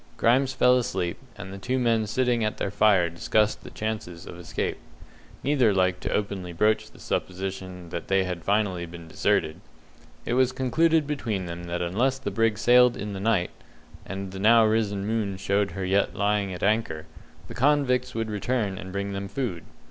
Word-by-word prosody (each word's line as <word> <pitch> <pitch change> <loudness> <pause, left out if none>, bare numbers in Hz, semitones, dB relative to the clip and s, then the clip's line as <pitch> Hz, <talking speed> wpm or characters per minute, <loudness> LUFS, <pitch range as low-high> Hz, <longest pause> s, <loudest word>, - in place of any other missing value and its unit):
Grimes 130 +3 +3
fell 125 -1 +4
asleep, 90 -7 -2 0.2
and 95 -1 -8
the 100 - -7
two 125 +6 -1
men 115 -3 +2
sitting 120 +1 +1
at 105 - -1
their 100 - -2
fire 100 -5 +4
discussed 105 +5 0
the - - -9
chances 105 -6 -5
of 85 - -9
escape. 85 - -3 0.6
Neither 130 -8 +3
liked 90 -1 +1
to - - -3
openly 95 -4 -2
broach 105 +5 +1
the - - -19
supposition 95 -1 -4
that 85 - -5
they 95 0 +3
had 90 -2 -3
been - - -18
finally 100 -4 0
deserted. 80 -2 -1 0.6
It - - -1
was 130 0 +3
concluded 155 +5 +2
between 115 -10 -2
them 85 0 -6
that 85 0 -2
unless 120 +10 +1
the 130 -6 -4
brig 115 +1 +1
sailed 125 +1 +5
in 105 0 -5
the 95 - -5
night 100 -3 +1 0.5
and 95 0 -6
the 95 - -7
now 110 +2 +6
risen 105 -3 0
moon 105 -3 -1
showed 100 +1 +1
her 95 - -2
yet 100 +2 +1
lying 100 -1 +1
at 90 - -6
anchor 100 -7 0 0.4
the - - -8
convicts 125 -2 +2
would 115 -1 -2
return 105 -2 -1
and 95 - -8
bring 100 +1 -3
them 100 0 -4
food. 100 - -3
100 Hz, 185 wpm, -26 LUFS, 95-120 Hz, 0.6 s, now